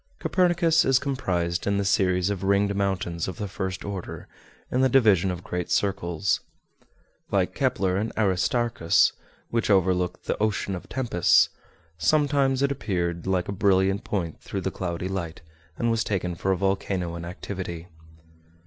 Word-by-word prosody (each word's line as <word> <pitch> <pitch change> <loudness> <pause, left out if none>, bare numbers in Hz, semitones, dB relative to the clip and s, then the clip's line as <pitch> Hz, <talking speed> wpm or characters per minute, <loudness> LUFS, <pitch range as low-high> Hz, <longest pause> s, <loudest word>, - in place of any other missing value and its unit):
Copernicus 175 -3 +3
is 135 -1 +4
comprised 95 -12 -1
in 100 0 +2
the 100 - 0
series 95 -1 +2
of 95 -3 -3
ringed 100 +1 +2
mountains 95 -4 -1
of 95 - -5
the 105 -3 -3
first 95 0 -4
order, 100 -3 -6 0.4
in 125 - +2
the 130 - +4
division 105 -8 +4
of 90 -1 -4
great 90 -1 -4
circles. 95 -2 0 0.9
Like - - +1
Kepler 95 -1 0
and 110 +3 -1
Aristarchus, 100 -1 +2 0.4
which 115 -1 0
overlook 90 -2 +2
the - - -2
"Ocean 105 -2 0
of 90 - -7
Tempests," 120 -10 +3 0.5
sometimes 140 - +2
it 140 - +2
appeared 90 -9 -2
like 95 -2 0
a - - -3
brilliant 95 +1 +2
point 85 -6 -3
through - - -4
the - - -2
cloudy 90 0 -3
light, 90 -4 -4 0.4
and 120 0 +1
was 115 -1 +1
taken 90 -3 -2
for 90 +3 -1
a 95 - +1
volcano 95 -2 -1
in 85 - -6
activity. 90 -1 -6
95 Hz, 155 wpm, -25 LUFS, 90-110 Hz, 0.9 s, is